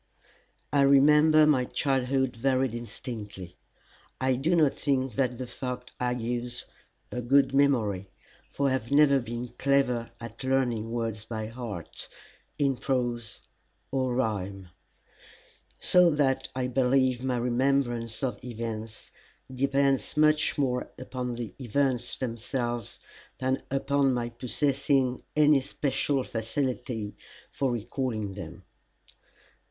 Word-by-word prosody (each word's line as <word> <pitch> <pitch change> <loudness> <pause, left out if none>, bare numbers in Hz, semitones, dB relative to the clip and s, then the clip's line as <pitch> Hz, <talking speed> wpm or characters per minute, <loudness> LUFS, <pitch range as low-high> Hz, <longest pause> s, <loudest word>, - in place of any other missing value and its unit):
I 145 - +4
I - - +6
remember 150 +3 +6
my 145 -4 +4
childhood 130 -1 0
very 130 +2 +2
distinctly. 110 -6 -7 0.6
I 130 0 +2
do 155 +8 +1
not 155 -5 +4
think 135 -3 0
that 125 0 0
the 130 - -4
fact 125 0 -6
argues 125 0 -2 0.5
a 125 - -3
good 135 +2 +3
memory, 110 -9 +2 0.4
for 140 -1 +1
I - - 0
have 130 -3 -2
never 140 -1 +5
been 120 0 -5
clever 135 -4 +2
at 115 +1 -9
learning 125 -4 0
words 115 -2 -3
by 110 -2 -4
heart, 115 -8 -7 0.5
in 135 -3 +1
prose 120 -4 -2 0.5
or 130 -2 0
rhyme; 100 -6 -2 1.1
so 180 -1 +5
that 145 -4 +1
I 130 -1 -1
believe 130 0 +2
my 130 -2 0
remembrance 120 -2 0
of 130 - -2
events 115 -2 -6 0.4
depends 135 +1 +1
much 155 0 +4
more 125 -3 0
upon 125 -1 -4
the 115 -5 -6
events 125 -1 0
themselves 120 -1 -3 0.4
than 130 +1 0
upon 135 -1 +1
my 120 -1 -2
possessing 130 +2 +1
any 150 -2 +5
special 135 0 -1
facility 115 -2 -3 0.4
for 135 -2 0
recalling 115 -3 -3
them. 90 -5 -9
125 Hz, 115 wpm, -28 LUFS, 120-135 Hz, 1.1 s, I